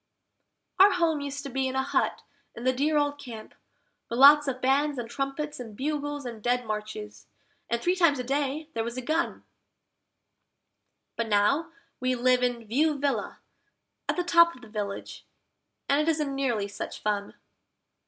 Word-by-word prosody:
Our 395 Hz, +1 st, +8 dB
home 330 Hz, -4 st, +1 dB
used 280 Hz, 0 st, -5 dB
to 280 Hz, -, -6 dB
be 265 Hz, +1 st, 0 dB
in 260 Hz, -, -4 dB
a 265 Hz, -, +1 dB
hut -, -, 0 dB, 0.3 s
in 235 Hz, -, -8 dB
the 255 Hz, 0 st, +3 dB
dear 300 Hz, +4 st, +1 dB
old 290 Hz, 0 st, 0 dB
Camp, 230 Hz, -6 st, -9 dB, 0.6 s
with 235 Hz, -, -3 dB
lots 290 Hz, +2 st, +8 dB
of 255 Hz, -1 st, -2 dB
bands 275 Hz, +2 st, +2 dB
and 240 Hz, -2 st, -4 dB
trumpets 275 Hz, +4 st, -4 dB
and 225 Hz, -4 st, -8 dB
bugles 290 Hz, 0 st, -3 dB
and 230 Hz, -3 st, -7 dB
Dead 245 Hz, +2 st, 0 dB
Marches, 210 Hz, -, -6 dB, 0.4 s
and 235 Hz, -, 0 dB
three 355 Hz, +9 st, +1 dB
times 335 Hz, -6 st, +4 dB
a 250 Hz, -, -3 dB
day 280 Hz, +3 st, -1 dB
there 225 Hz, -, -1 dB
was 235 Hz, +2 st, -5 dB
a 255 Hz, -, -4 dB
gun, 320 Hz, +6 st, -1 dB, 1.7 s
But 230 Hz, -, -1 dB
now 225 Hz, +11 st, +2 dB, 0.3 s
we 255 Hz, 0 st, 0 dB
live 250 Hz, +1 st, +3 dB
in 245 Hz, -2 st, -1 dB
View 295 Hz, +7 st, +1 dB
Villa 280 Hz, 0 st, -2 dB, 0.7 s
at -, -, +2 dB
the 355 Hz, -, 0 dB
top 340 Hz, -1 st, +5 dB
of 250 Hz, -, -16 dB
the 220 Hz, -, -12 dB
village, 205 Hz, -2 st, -5 dB, 0.6 s
and 280 Hz, +2 st, +3 dB
it 310 Hz, -, +1 dB
isn't 300 Hz, -3 st, 0 dB
nearly 245 Hz, -7 st, 0 dB
such 200 Hz, -, -6 dB
fun. 205 Hz, -1 st, -2 dB
265 Hz, 175 wpm, -27 LUFS, 235-295 Hz, 1.7 s, Our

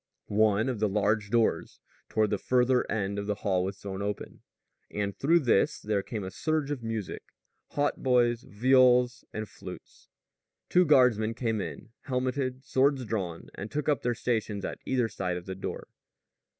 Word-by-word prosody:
One 110 Hz, +2 st, +3 dB
of 125 Hz, -5 st, -2 dB
the 105 Hz, -1 st, +2 dB
large 105 Hz, +1 st, +1 dB
doors 115 Hz, 0 st, +1 dB, 0.3 s
toward 110 Hz, -1 st, +1 dB
the 105 Hz, -, 0 dB
farther 125 Hz, 0 st, +2 dB
end 100 Hz, -1 st, -1 dB
of 100 Hz, -, -4 dB
the 105 Hz, -, 0 dB
hall 95 Hz, -3 st, +2 dB
was 95 Hz, +1 st, -4 dB
thrown 100 Hz, -1 st, -6 dB
open, 100 Hz, 0 st, -5 dB, 0.5 s
and 100 Hz, -2 st, -3 dB
through 165 Hz, +9 st, +3 dB
this 120 Hz, -7 st, +2 dB
there 105 Hz, -2 st, 0 dB
came 105 Hz, +1 st, -5 dB
a 95 Hz, -, -5 dB
surge 155 Hz, +1 st, -1 dB
of 140 Hz, -4 st, -3 dB
music 115 Hz, -4 st, -4 dB, 0.5 s
hautboys, 125 Hz, -4 st, +2 dB
viols, 125 Hz, +2 st, +4 dB
and 110 Hz, 0 st, -4 dB
flutes. 95 Hz, -1 st, -11 dB, 0.6 s
Two 180 Hz, 0 st, +5 dB
guardsmen 120 Hz, -7 st, +4 dB
came 115 Hz, -3 st, -1 dB
in, 105 Hz, -, -7 dB, 0.2 s
helmeted, 130 Hz, 0 st, -2 dB
swords 135 Hz, -1 st, +2 dB
drawn, 95 Hz, -7 st, -4 dB
and 100 Hz, -, -6 dB
took 150 Hz, +3 st, -3 dB
up 150 Hz, -2 st, +2 dB
their 120 Hz, -1 st, 0 dB
stations 110 Hz, -4 st, -1 dB
at -, -, -5 dB
either 125 Hz, -3 st, +2 dB
side 95 Hz, -4 st, -3 dB
of 90 Hz, -, -8 dB
the 95 Hz, -, -4 dB
door. 95 Hz, -, -6 dB
110 Hz, 165 wpm, -29 LUFS, 100-130 Hz, 0.6 s, Two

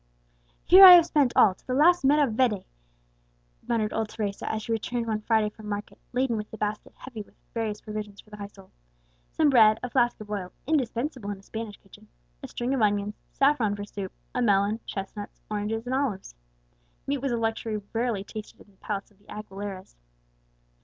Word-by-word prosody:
"Here, 375 Hz, +2 st, +9 dB
I 370 Hz, -1 st, +13 dB
have 345 Hz, -2 st, +8 dB
spent 290 Hz, -6 st, +2 dB
all, 195 Hz, -, +6 dB
to -, -, -29 dB
the 255 Hz, -, -1 dB
last 345 Hz, +4 st, +5 dB
maravedi," 260 Hz, -7 st, +2 dB, 1.0 s
muttered 220 Hz, -2 st, 0 dB
old 220 Hz, -1 st, -1 dB
Teresa, 205 Hz, -3 st, -4 dB
as 220 Hz, -1 st, -3 dB
she 230 Hz, -, -5 dB
returned 230 Hz, +2 st, -2 dB
one 215 Hz, -1 st, -2 dB
Friday 215 Hz, -1 st, +1 dB
from 215 Hz, -1 st, -11 dB
market, 205 Hz, 0 st, -5 dB
laden 250 Hz, -2 st, 0 dB
with 210 Hz, 0 st, -6 dB
a 220 Hz, -, -8 dB
basket 210 Hz, 0 st, -4 dB
heavy 245 Hz, -5 st, -8 dB
with 205 Hz, -, -15 dB, 0.2 s
various 220 Hz, -2 st, -3 dB
provisions 210 Hz, -2 st, -7 dB
for 215 Hz, -, -16 dB
the 210 Hz, -, -9 dB
household: 200 Hz, -2 st, -11 dB, 0.6 s
some 305 Hz, -3 st, +3 dB
bread, 220 Hz, -4 st, +6 dB
a 250 Hz, -, -4 dB
flask 240 Hz, -2 st, +2 dB
of 210 Hz, -1 st, -10 dB
oil 190 Hz, -3 st, -4 dB
(indispensable 255 Hz, -4 st, -1 dB
in 205 Hz, -, -4 dB
a 195 Hz, -, -18 dB
Spanish 220 Hz, -1 st, -7 dB
kitchen), -, -, -18 dB, 0.3 s
a -, -, -7 dB
string 245 Hz, +2 st, -3 dB
of 265 Hz, -, 0 dB
onions, 205 Hz, 0 st, +1 dB, 0.2 s
saffron 265 Hz, -7 st, +2 dB
for 205 Hz, -, -6 dB
soup, 195 Hz, -2 st, -6 dB, 0.2 s
a 250 Hz, -, -1 dB
melon, 205 Hz, -1 st, +2 dB
chestnuts, 205 Hz, +1 st, -6 dB
oranges, 215 Hz, +2 st, -2 dB
and 250 Hz, -, -3 dB
olives. 260 Hz, -, -2 dB, 0.7 s
Meat 280 Hz, 0 st, -1 dB
was 270 Hz, 0 st, -2 dB
a 235 Hz, -, 0 dB
luxury 225 Hz, -1 st, -2 dB
rarely 230 Hz, -4 st, -1 dB
tasted 215 Hz, +1 st, -9 dB
in 205 Hz, -, -18 dB
the 195 Hz, -, -29 dB
palace 205 Hz, +1 st, -5 dB
of 200 Hz, -, -28 dB
the 205 Hz, -, -27 dB
Aguileras. 200 Hz, -, -8 dB
220 Hz, 190 wpm, -26 LUFS, 205-245 Hz, 1.0 s, I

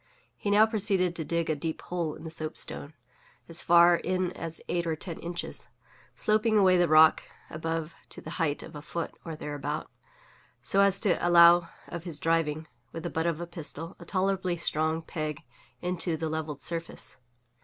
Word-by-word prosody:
He 205 Hz, -, -3 dB
now 210 Hz, +2 st, +6 dB
proceeded 195 Hz, -5 st, +1 dB
to 165 Hz, -, -1 dB
dig 170 Hz, +2 st, -1 dB
a 155 Hz, -, +1 dB
deep 160 Hz, +2 st, -4 dB
hole 170 Hz, -4 st, -3 dB
in -, -, -12 dB
the 160 Hz, -, -7 dB
soapstone 155 Hz, -1 st, -4 dB, 0.5 s
(as 165 Hz, 0 st, -4 dB
far 170 Hz, 0 st, +6 dB
in 185 Hz, 0 st, -1 dB
as 165 Hz, -2 st, -5 dB
eight 170 Hz, -1 st, -1 dB
or 160 Hz, -, 0 dB
ten 165 Hz, +1 st, -6 dB
inches), 175 Hz, 0 st, -5 dB, 0.5 s
sloping 215 Hz, +1 st, +2 dB
away 190 Hz, -2 st, +5 dB
the 175 Hz, -1 st, +4 dB
rock 155 Hz, 0 st, +6 dB, 0.3 s
above 165 Hz, 0 st, -3 dB, 0.2 s
to -, -, -8 dB
the -, -, -8 dB
height 150 Hz, -3 st, 0 dB
of -, -, -11 dB
a 150 Hz, -, -7 dB
foot, 170 Hz, +2 st, -4 dB
or 165 Hz, -2 st, -6 dB
thereabout, 150 Hz, 0 st, -4 dB, 0.7 s
so 195 Hz, -, +2 dB
as 200 Hz, -1 st, +4 dB
to 200 Hz, -5 st, +2 dB
allow 170 Hz, 0 st, +7 dB, 0.2 s
of 170 Hz, 0 st, -7 dB
his 165 Hz, -4 st, -4 dB
driving, 160 Hz, 0 st, 0 dB, 0.3 s
with 165 Hz, -, -7 dB
the -, -, -3 dB
butt 160 Hz, +1 st, 0 dB
of 165 Hz, -2 st, -1 dB
a 175 Hz, -, -4 dB
pistol, 165 Hz, 0 st, -7 dB
a -, -, -10 dB
tolerably 190 Hz, -2 st, 0 dB
strong 160 Hz, 0 st, 0 dB
peg 155 Hz, 0 st, -4 dB, 0.4 s
into 175 Hz, -2 st, 0 dB
the 160 Hz, 0 st, -2 dB
levelled 155 Hz, -2 st, -4 dB
surface. 165 Hz, 0 st, -2 dB
170 Hz, 180 wpm, -28 LUFS, 160-180 Hz, 0.7 s, allow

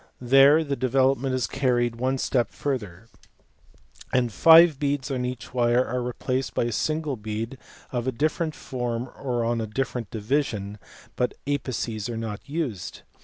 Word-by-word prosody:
There 135 Hz, +5 st, +6 dB
the 140 Hz, -2 st, -2 dB
development 130 Hz, +1 st, +1 dB
is 130 Hz, -, 0 dB
carried 120 Hz, -3 st, 0 dB
one 130 Hz, +2 st, 0 dB
step 120 Hz, -3 st, 0 dB
further, 115 Hz, -7 st, -4 dB, 1.0 s
and 125 Hz, -4 st, +1 dB
five 160 Hz, -, +7 dB
beads 145 Hz, -1 st, -1 dB
on 125 Hz, -2 st, -1 dB
each 125 Hz, -1 st, -6 dB
wire 120 Hz, 0 st, +3 dB
are 125 Hz, +1 st, -2 dB
replaced 125 Hz, +2 st, -3 dB
by -, -, +2 dB
a 120 Hz, -, -1 dB
single 155 Hz, +4 st, -1 dB
bead 110 Hz, +3 st, -5 dB, 0.3 s
of 120 Hz, 0 st, -2 dB
a -, -, +2 dB
different 155 Hz, +5 st, -1 dB
form 125 Hz, -1 st, -4 dB
or 120 Hz, -3 st, -2 dB
on 115 Hz, 0 st, 0 dB
a 110 Hz, -, -3 dB
different 120 Hz, -1 st, -3 dB
division, 105 Hz, -3 st, -2 dB, 0.4 s
but 125 Hz, -, -1 dB
apices 125 Hz, -6 st, -2 dB
are 115 Hz, -, -4 dB
not 110 Hz, -2 st, -4 dB
used. 140 Hz, -, -4 dB
125 Hz, 155 wpm, -25 LUFS, 115-135 Hz, 1.0 s, five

